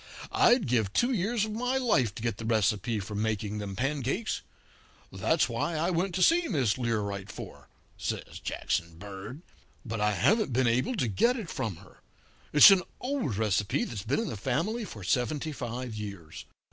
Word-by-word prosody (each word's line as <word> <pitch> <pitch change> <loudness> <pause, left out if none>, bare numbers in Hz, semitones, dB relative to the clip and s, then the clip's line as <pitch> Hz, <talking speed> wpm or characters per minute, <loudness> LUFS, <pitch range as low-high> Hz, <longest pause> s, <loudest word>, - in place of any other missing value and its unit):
I'd 240 -2 +4
give 115 -6 +1
two 240 - +2
years 215 0 +1
of 215 - -6
my 250 +4 0
life 135 - +2
to 115 - -7
get 115 -1 -1
the 115 - -6
recipe 110 +1 +1
for 105 +2 -6
making 105 0 -2
them 100 -2 -5
pancakes. 140 - -1 0.7
That's - - +1
what 170 - -2
I 165 +4 0
went 180 +1 0
to 185 - +2
see 335 +1 +4
Miss 130 - +1
Learight 100 -5 -2
for,' - - -10 0.3
says - - -4
Jackson 85 -1 -2
Bird, 100 - -8 0.4
'but 115 -2 -3
I 105 0 +2
haven't 195 - +2
been 130 +2 +2
able 125 - +1
to 130 - 0
get 235 - +2
it 210 -9 -6
from 110 -5 -3
her. - - -17 0.5
It's 150 +7 +10
an 195 -2 +5 0.2
old 250 - -2
recipe 105 -2 +1
that's 105 -5 -5
been 115 +8 0
in 230 - -3
the 110 - -5
family 170 - -1
for 105 - -9
seventy 140 - 0
five 125 -3 -5
years. 100 -7 -7
120 Hz, 180 wpm, -29 LUFS, -, 0.7 s, It's